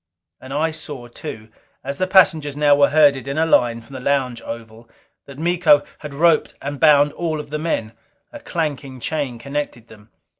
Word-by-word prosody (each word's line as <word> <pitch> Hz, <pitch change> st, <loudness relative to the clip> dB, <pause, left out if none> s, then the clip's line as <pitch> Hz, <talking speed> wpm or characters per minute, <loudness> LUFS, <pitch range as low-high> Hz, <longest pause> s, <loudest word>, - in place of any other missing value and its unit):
And 130 Hz, -, -11 dB
I 155 Hz, +3 st, 0 dB
saw 145 Hz, -5 st, -8 dB
too, 110 Hz, -2 st, -9 dB, 0.3 s
as 140 Hz, +1 st, -5 dB
the 185 Hz, -, +1 dB
passengers 160 Hz, -6 st, +3 dB
now 145 Hz, -1 st, +4 dB
were 140 Hz, 0 st, +4 dB
herded 145 Hz, -3 st, +3 dB
in 140 Hz, +2 st, -3 dB
a 160 Hz, -, +3 dB
line 120 Hz, -7 st, +2 dB
from 115 Hz, +4 st, -16 dB
the 130 Hz, -, -6 dB
lounge 125 Hz, -3 st, -1 dB
oval, 115 Hz, 0 st, -9 dB, 0.4 s
that 140 Hz, -1 st, -11 dB
Miko 165 Hz, -3 st, +3 dB, 0.2 s
had 150 Hz, -2 st, -8 dB
roped 165 Hz, +1 st, +2 dB
and 140 Hz, 0 st, -6 dB
bound 145 Hz, -2 st, +5 dB
all 160 Hz, -3 st, -3 dB
of 150 Hz, -, -9 dB
the 150 Hz, -, -2 dB
men, 115 Hz, -9 st, -2 dB, 0.4 s
a 295 Hz, -, -8 dB
clanking 145 Hz, -, -4 dB
chain 140 Hz, -3 st, -3 dB
connected 140 Hz, -2 st, -5 dB
them. 105 Hz, 0 st, -17 dB
145 Hz, 185 wpm, -20 LUFS, 125-155 Hz, 0.4 s, bound